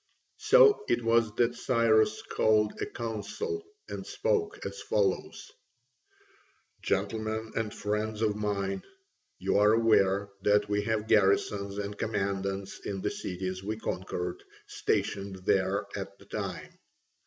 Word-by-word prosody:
So 445 -4 +6
it 120 - +2
was 115 -1 +3
that 120 0 +2
Cyrus 115 -3 +2
called 105 -1 +2
a - - -1
council 120 - -4 0.2
and - - -5
spoke 445 -4 -1
as 100 0 -5
follows: 100 -3 -1 1.3
"Gentlemen 110 +3 -1
and 110 -2 -1
friends 105 +1 -2
of 105 -2 +2
mine, 100 -2 -2 0.6
you - - +1
are 105 +1 +5
aware 100 -3 +3
that 105 +1 +3
we 105 0 +1
have 110 -1 -1
garrisons 100 -1 +2
and 100 0 -4
commandants 100 -2 -2
in 95 -1 -5
the 105 - -1
cities 95 0 -4
we 105 +2 -3
conquered, 90 -4 -4 0.2
stationed 100 -1 -1
there 95 +2 +2
at 100 0 -6
the - - -17
time. - - -6
105 Hz, 125 wpm, -29 LUFS, 100-110 Hz, 1.3 s, So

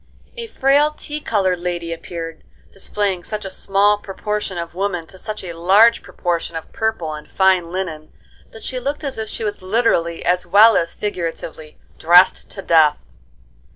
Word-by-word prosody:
A 470 -1 -6
frail, 285 -5 +3
tea 300 0 -6
colored 190 - 0
lady 175 -1 -3
appeared, 165 -1 -7 0.3
displaying 195 -2 -2
such 210 0 -5
a 190 - -5
small 200 +2 +2
proportion 210 -1 -4
of 170 0 -5
woman 180 -2 -2
to 190 +3 -14
such 215 0 -6
a 175 -2 -6
large 195 +8 +4
proportion 170 -2 -3
of 160 - -7
purple 220 -8 -2
and 150 0 -9
fine 185 -3 +2
linen, 165 -5 -5 0.4
that 225 - -12
she 255 - -3
looked 280 +4 -4
as 275 -5 -4
if 220 -1 -4
she - - -5
was 205 -2 -3
literally 185 -5 0
as 180 +1 +2
well 210 +5 +6
as 170 - 0
figuratively 165 -5 -5 0.2
"dressed 175 +3 +5
to 195 - -8
death." 160 -3 +4
190 Hz, 165 wpm, -19 LUFS, 170-215 Hz, 0.4 s, well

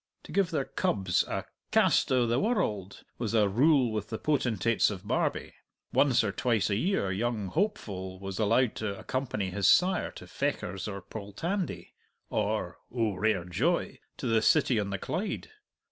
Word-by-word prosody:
To - - -11
give 195 -3 +2
their 150 -5 -1
cubs 95 -4 +1
a - - -3 0.2
"cast - - +3
o' 125 -2 +4
the 120 +2 +1
world" 105 - -1 0.2
was 115 -1 -1
a 105 -2 +5
rule 130 +3 +4
with 110 -1 -3
the 110 - -3
potentates 115 -6 +1
of 100 -1 -7
Barbie; - - -1 0.4
once 135 -5 +4
or 105 - 0
twice 110 -2 +1
a - - +2
year 165 - 0
young 105 0 -1
Hopeful 100 - -2
was 95 -1 -5
allowed 115 +3 +3
to 100 -3 -3
accompany 110 -8 -3
his 100 +1 +1
sire 185 +1 +4
to - - -10
Fechars 95 +1 -3
or 100 -2 -6
Poltandie, 150 - -4 0.4
or - - -1
oh, 115 -4 0
rare 95 -2 0
joy! 90 -2 0 0.2
to - - -6
the 115 -1 +3
city 130 -2 +3
on 100 -1 -2
the 100 - -2
Clyde. 175 - -4
110 Hz, 165 wpm, -29 LUFS, 100-130 Hz, 0.4 s, a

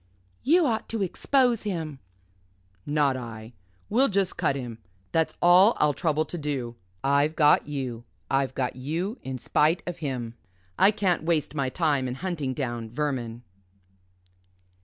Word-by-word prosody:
"You 335 +5 +4
ought 225 -5 -1
to 225 -3 -1
expose 245 +5 +2
him." 160 -9 -4 0.9
"Not 145 -2 +2
I 115 -2 -8 0.3
we'll 255 +5 +3
just 195 -4 0
cut 135 - +1
him. 120 -4 -6 0.3
That's 160 -1 0
all 185 +6 +7
I'll 150 -1 +3
trouble 155 0 0
to 175 - -6
do. 135 -6 -3 0.3
I've 140 +3 +2
got 150 -2 +4
you 130 -5 -4 0.2
I've 135 -1 0
got 125 -2 -1
you 165 - -3
in 130 -1 -5
spite 155 +7 +2
of 175 -1 -5
him 125 -6 -4 0.4
I 195 - +6
can't 195 -4 +1
waste 160 -2 0
my 140 -3 -1
time 145 -4 +1
in 125 - -4
hunting 155 -6 -3
down 120 -5 -3
vermin." 120 -3 -3
150 Hz, 145 wpm, -26 LUFS, 130-175 Hz, 0.9 s, all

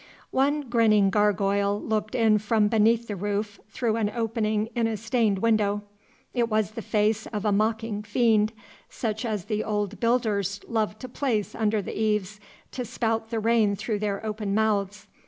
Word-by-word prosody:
One 285 +3 +2
grinning 225 -6 +3
gargoyle 200 0 +2
looked 215 +1 -2
in 220 -3 +4
from 210 0 +2
beneath 225 +1 +3
the 205 - -3
roof 205 +1 -3
through 225 +1 -1
an 215 -2 +1
opening 220 -2 0
in 235 -2 +1
a 225 -1 -2
stained 220 -2 +1
window. 210 -1 +1 0.5
It 235 -2 +1
was 215 -1 +1
the 225 - -6
face 215 0 0
of 210 -1 -4
a 210 - +3
mocking 215 +1 0
fiend, 215 0 +2 0.4
such 220 0 -3
as 210 -5 -2
the 215 0 -1
old 210 -1 -2
builders 215 -5 +1
loved 215 -2 -1
to 255 - -6
place 235 -5 -1
under 215 -2 0
the - - -6
eaves 210 -1 -1 0.3
to 250 - -4
spout 225 -1 -2
the 230 - -2
rain 220 -2 +2
through 210 +2 -3
their 205 0 -2
open 210 -2 -2
mouths. 210 -2 0
215 Hz, 170 wpm, -26 LUFS, 205-225 Hz, 0.5 s, in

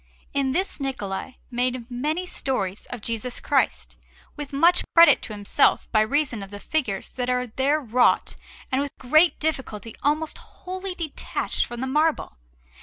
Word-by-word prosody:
In 275 -1 +1
this 370 +5 -1
Niccola 255 -3 -4 0.2
made 245 0 -1
many 305 +9 -1
stories 210 - -3
of 245 - -7
Jesus 230 +2 -3
Christ, - - 0 0.4
with 295 -2 -6
much 335 +6 +4
credit 335 0 +8
to 220 - -7
himself, 205 -1 +2
by 215 - +4
reason 265 -1 0
of 195 - -8
the 205 0 -8
figures 220 -8 -2
that 250 -1 -2
are 250 0 +1
there 265 +6 +1
wrought 245 -2 +2 0.4
and 265 +1 +2
with 285 - -2
great 310 +7 +4
difficulty 265 -8 -3
almost 305 +2 0
wholly 370 0 -7
detached 320 -5 -2
from 240 0 -6
the - - -1
marble. 300 - 0
265 Hz, 155 wpm, -24 LUFS, 235-310 Hz, 0.4 s, credit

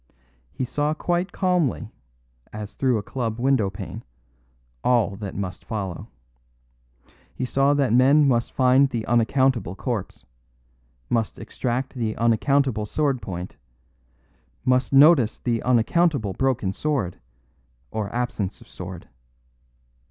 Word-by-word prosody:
He 130 - -3
saw 150 +4 -1
quite 175 +3 -1
calmly, 175 - 0 0.6
as 105 -1 -7
through 130 -3 +1
a 105 - -3
club 115 -1 -3
windowpane, 120 -7 -1 0.8
all 115 -5 +2
that 100 -2 -6
must 95 -2 -5
follow. 95 -6 -5 1.3
He 130 - -2
saw 135 +3 +2
that 135 -6 +1
men 140 +4 +5
must 120 -3 +1
find 130 +1 +4
the 115 -4 -3
unaccountable 120 -3 +2
corpse; 110 -4 -4 0.8
must 115 - -1
extract 130 +1 -3
the 115 -4 -3
unaccountable 115 0 +2
sword 140 -1 0
point; 90 -3 -6 1.1
must 125 -1 +2
notice 140 -4 +6
the 115 -2 -1
unaccountable 125 - +2
broken 125 -7 0
sword 135 - -2 0.7
or 105 -2 -3
absence 120 -5 -3
of - - -17
sword. 90 -1 -9
120 Hz, 115 wpm, -24 LUFS, 105-135 Hz, 1.3 s, notice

